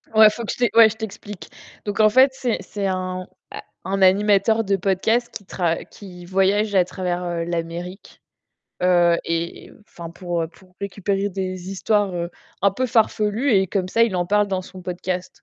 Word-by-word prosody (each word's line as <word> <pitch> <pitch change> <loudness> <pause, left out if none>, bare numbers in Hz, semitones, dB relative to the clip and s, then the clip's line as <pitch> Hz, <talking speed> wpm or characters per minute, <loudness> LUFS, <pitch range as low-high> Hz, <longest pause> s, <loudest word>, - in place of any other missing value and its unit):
Ouais, 220 -1 +9
faut 230 +2 -6
que - - -2
je - - -10
t'é 240 -3 +2
ouais, 225 -1 +8
je 215 - -7
t'explique, 210 -2 -8 0.4
donc 205 +1 -3
en 215 0 +6
fait, 260 +5 +6
c'est 250 -3 -1
c'est 200 -2 -4
un 185 -1 -3 0.6
un 195 +2 -2
animateur 205 +3 +4
de 200 -1 +1
podcast 210 +6 +1
qui 200 - -8
tra 170 -3 -1
qui 180 -3 -12
voyage 195 +3 +1
à 180 -2 +5
travers 175 -2 -3
l'Amérique, 170 +3 -6 0.6
heu 175 -2 +4
et 165 +1 -3 0.2
enfin 170 -1 -9
pour, 175 -1 -3
heu, 160 - -3
pour 185 +1 -22
récupérer 200 0 -2
des 185 -1 -5
histoires, 200 -1 0
heu, 170 0 -3 0.3
un 200 - +5
peu 255 +7 -2
farfelues 220 +2 +1
et 190 -1 +4
comme 185 0 -2
ça, 230 +4 +2
il 225 -5 +2
en 175 0 0
parle 205 +1 +2
dans 190 -1 -1
son 185 0 -12
podcast 180 0 -5
190 Hz, 185 wpm, -22 LUFS, 180-210 Hz, 0.6 s, Ouais